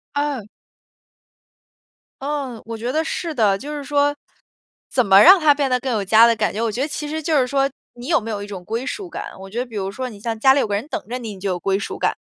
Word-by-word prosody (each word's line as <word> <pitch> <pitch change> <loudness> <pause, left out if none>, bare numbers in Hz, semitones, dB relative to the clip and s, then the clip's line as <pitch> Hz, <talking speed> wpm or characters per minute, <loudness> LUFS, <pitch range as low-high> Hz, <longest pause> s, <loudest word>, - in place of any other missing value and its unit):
嗯。 285 -7 -2 1.7
嗯， 275 -5 -4
我 230 0 -6
觉 240 +3 -3
得 315 +2 0
是 325 0 -3
的。 210 -6 +2
就 295 +7 -7
是 290 - -5
说， 290 0 +1 0.7
怎 250 -4 +1
么 195 0 +7
让 380 +3 +9
它 310 -3 +5
变 280 -2 -1
得 250 0 +2
更 260 0 -3
有 210 - 0
家 220 +4 +7
的 235 -1 +4
感 215 -1 0
觉， 215 - -3
我 230 -2 0
觉 245 - -3
得 290 - 0
其 295 0 -5
实 315 +1 -3
就 310 -1 +1
是 250 - +1
说 275 +1 +1 0.3
你 245 +2 -9
有 330 - +3
没 225 +1 -5
有 205 -1 -3
一 - - -8
种 190 -3 -8
归 230 +7 -3
属 375 +3 -5
感。 - - -6
我 195 0 -10
觉 230 +4 -4
得 250 - -1
比 235 -3 -12
如 195 -1 -2
说 255 +3 -5
你 205 -3 -12
像 225 0 -4
家 265 +4 +6
里 280 - +2
有 225 - +1
个 205 - -1
人 215 +8 -3
等 330 - -4
着 250 +2 -3
你， 225 -4 -6
你 - - -13
就 195 +1 -2
有 180 -1 -2
归 195 +1 0
属 200 - -5
感， - - +1
245 Hz, 300 characters per minute, -21 LUFS, 215-285 Hz, 1.7 s, 让